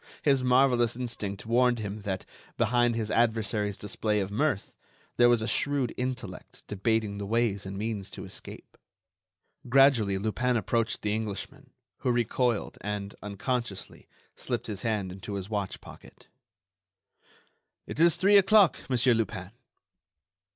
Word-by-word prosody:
His 135 Hz, -5 st, +3 dB
marvellous 125 Hz, -2 st, +3 dB
instinct 105 Hz, -5 st, -5 dB
warned 120 Hz, +1 st, +3 dB
him 105 Hz, -1 st, -5 dB
that, 95 Hz, -2 st, -4 dB, 0.3 s
behind 120 Hz, +1 st, +2 dB
his 110 Hz, -2 st, -2 dB
adversary's 110 Hz, -3 st, +1 dB
display 105 Hz, +1 st, -1 dB
of 95 Hz, 0 st, -3 dB
mirth, 130 Hz, -1 st, -1 dB, 0.4 s
there 120 Hz, 0 st, +6 dB
was 120 Hz, -2 st, +3 dB
a -, -, -2 dB
shrewd 140 Hz, -3 st, 0 dB
intellect 125 Hz, -7 st, -5 dB
debating 105 Hz, 0 st, -1 dB
the 100 Hz, -, -4 dB
ways 105 Hz, -3 st, 0 dB
and 95 Hz, 0 st, -6 dB
means 105 Hz, -2 st, -3 dB
to -, -, -8 dB
escape. -, -, -10 dB, 0.9 s
Gradually 125 Hz, -7 st, +5 dB
Lupin 120 Hz, +5 st, 0 dB
approached 115 Hz, +2 st, -1 dB
the 105 Hz, 0 st, 0 dB
Englishman, 110 Hz, -2 st, -5 dB, 0.3 s
who 125 Hz, -, 0 dB
recoiled, 120 Hz, -1 st, 0 dB
and, 105 Hz, -1 st, -4 dB
unconsciously, 105 Hz, +1 st, -4 dB, 0.3 s
slipped -, -, -3 dB
his 100 Hz, -2 st, -5 dB
hand 105 Hz, -5 st, -1 dB
into 95 Hz, +2 st, -7 dB
his 100 Hz, +2 st, -6 dB
watch 100 Hz, -3 st, -2 dB
pocket. -, -, -15 dB, 1.6 s
"It -, -, -7 dB
is 170 Hz, 0 st, +5 dB
three 200 Hz, +2 st, +5 dB
o'clock, 200 Hz, -2 st, +5 dB
Monsieur 125 Hz, -1 st, +4 dB
Lupin." 100 Hz, -4 st, -2 dB
110 Hz, 135 wpm, -28 LUFS, 100-125 Hz, 1.6 s, there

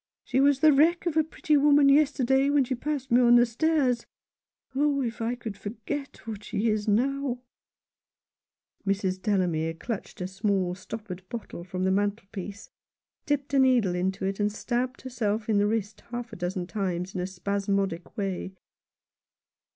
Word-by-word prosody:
She 260 Hz, -, 0 dB
was 275 Hz, 0 st, +4 dB
the 310 Hz, -1 st, +7 dB
wreck 330 Hz, +6 st, +4 dB
of 340 Hz, -3 st, 0 dB
a 315 Hz, -, +4 dB
pretty 305 Hz, 0 st, 0 dB
woman 285 Hz, 0 st, +5 dB
yesterday 275 Hz, -2 st, +4 dB
when 285 Hz, -1 st, +4 dB
she 260 Hz, +1 st, -2 dB
passed 270 Hz, 0 st, -3 dB
me 245 Hz, +1 st, +6 dB
on 240 Hz, 0 st, +6 dB
the 240 Hz, 0 st, +7 dB
stairs. 255 Hz, -1 st, +1 dB, 0.7 s
Oh, 280 Hz, 0 st, +2 dB
if 235 Hz, 0 st, -4 dB
I 230 Hz, +2 st, 0 dB
could 225 Hz, -4 st, -6 dB
forget 240 Hz, +9 st, -6 dB
what 215 Hz, -2 st, -6 dB
she 220 Hz, +3 st, -1 dB
is 215 Hz, -1 st, -1 dB
now! 250 Hz, +3 st, 0 dB, 0.7 s
" -, -, -31 dB
Mrs. 190 Hz, -1 st, 0 dB
Delamere 175 Hz, -5 st, 0 dB
clutched 220 Hz, +5 st, -6 dB
a 180 Hz, -, -2 dB
small 190 Hz, -1 st, 0 dB
stoppered 185 Hz, 0 st, -7 dB
bottle 230 Hz, -7 st, -6 dB
from 185 Hz, +1 st, -4 dB
the 190 Hz, -, +2 dB
mantelpiece, 200 Hz, 0 st, -3 dB, 0.6 s
dipped 285 Hz, -1 st, -1 dB
a 275 Hz, -, +4 dB
needle 250 Hz, -8 st, +4 dB
into 190 Hz, +2 st, -1 dB
it, 195 Hz, +1 st, -2 dB
and 205 Hz, 0 st, +1 dB
stabbed 250 Hz, +4 st, -2 dB
herself 220 Hz, -4 st, -2 dB
in 215 Hz, -2 st, +3 dB
the 205 Hz, -, +3 dB
wrist 215 Hz, -1 st, -2 dB
half 240 Hz, -1 st, -5 dB
a -, -, -5 dB
dozen 180 Hz, 0 st, -3 dB
times 185 Hz, -2 st, -3 dB
in 185 Hz, -, -2 dB
a 180 Hz, -, -2 dB
spasmodic 195 Hz, -1 st, -2 dB
way. 195 Hz, -2 st, -3 dB
220 Hz, 165 wpm, -27 LUFS, 195-265 Hz, 0.7 s, the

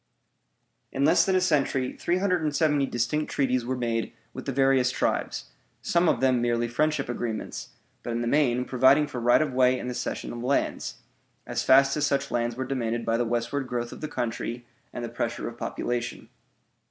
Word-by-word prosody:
In 135 Hz, +1 st, +1 dB
less 160 Hz, +4 st, +5 dB
than 190 Hz, -, +2 dB
a 185 Hz, -, +3 dB
century 140 Hz, -6 st, +1 dB
370 160 Hz, -6 st, +1 dB
distinct 130 Hz, +6 st, -1 dB
treaties 130 Hz, -3 st, +1 dB
were 130 Hz, +2 st, -2 dB
made 115 Hz, -2 st, -2 dB, 0.2 s
with -, -, -8 dB
the -, -, 0 dB
various 135 Hz, -1 st, +3 dB
tribes, 125 Hz, -, -2 dB, 0.3 s
some 170 Hz, -1 st, +3 dB
of -, -, +1 dB
them 130 Hz, -2 st, +3 dB
merely 120 Hz, 0 st, +1 dB
friendship 150 Hz, +4 st, 0 dB
agreements, 120 Hz, -2 st, -4 dB, 0.3 s
but -, -, -7 dB
in 120 Hz, 0 st, -1 dB
the 120 Hz, -, -1 dB
main 125 Hz, -2 st, +2 dB
providing 130 Hz, +4 st, +4 dB
for 130 Hz, -, -6 dB
right 120 Hz, +6 st, +4 dB
of 145 Hz, -4 st, -4 dB
way 130 Hz, 0 st, +4 dB
and 125 Hz, -, -5 dB
the 125 Hz, -, -3 dB
cession 125 Hz, -1 st, -4 dB
of 120 Hz, -, -6 dB
lands, 135 Hz, +3 st, -1 dB, 0.5 s
as -, -, -2 dB
fast 135 Hz, +1 st, +5 dB
as 150 Hz, -, 0 dB
such 140 Hz, 0 st, -1 dB
lands 120 Hz, 0 st, 0 dB
were 130 Hz, +1 st, -3 dB
demanded 120 Hz, -3 st, -2 dB
by 115 Hz, -, +1 dB
the 120 Hz, +1 st, +1 dB
westward 120 Hz, +4 st, -2 dB
growth 120 Hz, -1 st, -3 dB
of -, -, -10 dB
the 155 Hz, -, -3 dB
country 120 Hz, -2 st, -4 dB, 0.3 s
and 120 Hz, -, -5 dB
the -, -, -4 dB
pressure 120 Hz, 0 st, -3 dB
of 120 Hz, -, -7 dB
population. 120 Hz, -1 st, -3 dB
125 Hz, 190 wpm, -26 LUFS, 120-140 Hz, 0.5 s, less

